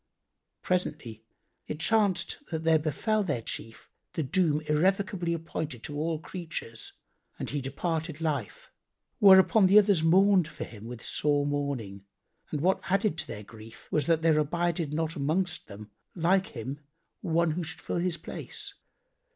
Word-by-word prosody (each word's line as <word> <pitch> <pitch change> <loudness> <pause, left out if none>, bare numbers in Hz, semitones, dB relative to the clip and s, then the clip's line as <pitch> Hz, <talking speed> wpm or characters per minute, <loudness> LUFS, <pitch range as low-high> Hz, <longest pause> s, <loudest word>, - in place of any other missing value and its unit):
Presently 150 -11 -2 0.5
it 150 - -5
chanced 205 0 +2
that 160 -1 -3
there 160 -1 +4
befel 190 - 0
their 145 - -2
chief 115 0 -6 0.3
the 160 - -1
doom 155 0 +1
irrevocably 175 +3 +1
appointed 155 -6 -4
to 145 - -6
all 160 +2 -1
creatures 160 -8 -7 0.4
and - - -4
he 145 0 -2
departed 160 +3 -3
life;[FN#89] 145 -9 -3 0.5
whereupon 195 +1 +7
the 195 +3 +6
others 200 -5 +5
mourned 185 +1 +5
for - - -7
him 110 -2 -10
with 120 0 -8
sore 145 -1 +1
mourning, 140 -9 -3 0.5
and 150 - -3
what 185 +4 +2
added 195 -1 +1
to 155 - -3
their 105 -2 -7
grief 110 +2 -14
was 150 -3 +1
that 165 -1 +2
there 160 -2 +4
abided 170 0 0
not 160 +1 -1
amongst 160 +5 -1
them 105 0 -11 0.2
like 185 +2 +2
him 130 +5 -5 0.4
one 165 0 +1
who 170 +3 -2
should 170 +2 -6
fill - - -3
his 175 -1 -1
place. 160 - -7
160 Hz, 150 wpm, -28 LUFS, 145-180 Hz, 0.5 s, whereupon